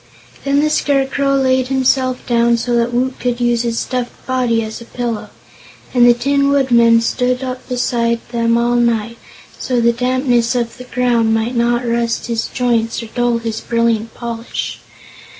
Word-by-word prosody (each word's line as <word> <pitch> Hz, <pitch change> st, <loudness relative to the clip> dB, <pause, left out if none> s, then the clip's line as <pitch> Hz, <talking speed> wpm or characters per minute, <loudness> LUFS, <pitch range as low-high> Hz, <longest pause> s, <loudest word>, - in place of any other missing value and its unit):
Then 280 Hz, +1 st, +2 dB
the 305 Hz, 0 st, +1 dB
Scarecrow 275 Hz, -1 st, +1 dB
laid 260 Hz, -1 st, +2 dB
himself 260 Hz, -1 st, 0 dB
down, 235 Hz, 0 st, +2 dB
so 240 Hz, +1 st, -1 dB
that 235 Hz, 0 st, +1 dB
Woot 255 Hz, +2 st, -1 dB
could 245 Hz, -1 st, -2 dB
use 240 Hz, -1 st, +1 dB
his 235 Hz, -1 st, -2 dB
stuffed 250 Hz, -1 st, -4 dB
body 245 Hz, -3 st, 0 dB
as 220 Hz, +1 st, -7 dB
a -, -, -10 dB
pillow, 235 Hz, -2 st, -4 dB, 0.6 s
and 245 Hz, -1 st, +5 dB
the 240 Hz, -, +6 dB
Tin 280 Hz, +3 st, +1 dB
Woodman 235 Hz, -5 st, +4 dB
stood 250 Hz, +2 st, 0 dB
up 255 Hz, 0 st, -6 dB
beside 235 Hz, -2 st, 0 dB
them 230 Hz, -1 st, +1 dB
all 240 Hz, +1 st, +1 dB
night, 230 Hz, -1 st, 0 dB, 0.4 s
so 250 Hz, -2 st, -1 dB
the 235 Hz, 0 st, +3 dB
dampness 250 Hz, 0 st, +1 dB
of 235 Hz, 0 st, -2 dB
the 250 Hz, -, -9 dB
ground 235 Hz, -3 st, +1 dB
might 225 Hz, +3 st, -1 dB
not 240 Hz, +1 st, +1 dB
rust 235 Hz, 0 st, -1 dB
his 230 Hz, -2 st, -2 dB
joints 235 Hz, -2 st, -1 dB
or 225 Hz, -, -9 dB
dull 240 Hz, -1 st, +1 dB
his 225 Hz, -1 st, -4 dB
brilliant 230 Hz, -1 st, 0 dB
polish. 235 Hz, -1 st, -5 dB
240 Hz, 170 wpm, -17 LUFS, 235-255 Hz, 0.6 s, the